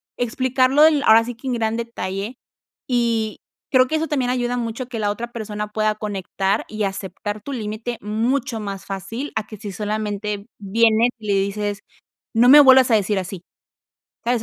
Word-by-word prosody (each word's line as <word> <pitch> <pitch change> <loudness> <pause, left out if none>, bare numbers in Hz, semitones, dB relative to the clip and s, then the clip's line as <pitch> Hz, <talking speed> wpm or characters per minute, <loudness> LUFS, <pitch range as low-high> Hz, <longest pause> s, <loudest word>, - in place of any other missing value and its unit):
explicarlo 255 +3 +2
del, 305 -2 +5
ahora 225 +1 +6
sí 245 0 -6
que 250 +4 -9
en 255 - 0
gran 225 -1 0
detalle, 230 -1 -4 0.5
y 230 -3 0 0.3
creo 255 -1 +5
que 315 - 0
eso 320 +1 0
también 260 -5 0
ayuda 245 -1 -1
mucho, 235 +1 -3
a - - -9
que 240 -3 -5
la 205 -1 +1
otra 235 +3 -6
persona 210 -2 -4
pueda 215 0 +1
conectar 200 -1 -2
y 215 0 -3
aceptar 200 +2 -4
tu 280 - -7
límite 225 0 -4
mucho 230 +3 -1
más 200 -2 -6
fácil, 200 +8 -5
a 220 - -1
que 215 - -9
si 205 -2 -7
solamente 210 0 -3
vienes 225 +3 +3
y 215 - -9
le 200 - +2
dices: 205 +1 -2 0.6
"No 235 +2 +5
me 290 - +10
vuelvas 260 -2 +7
a - - +5
decir 205 -1 0
así", 185 -1 -7 0.8
¿sabes? 240 -1 +1
220 Hz, 185 wpm, -21 LUFS, 205-245 Hz, 0.8 s, me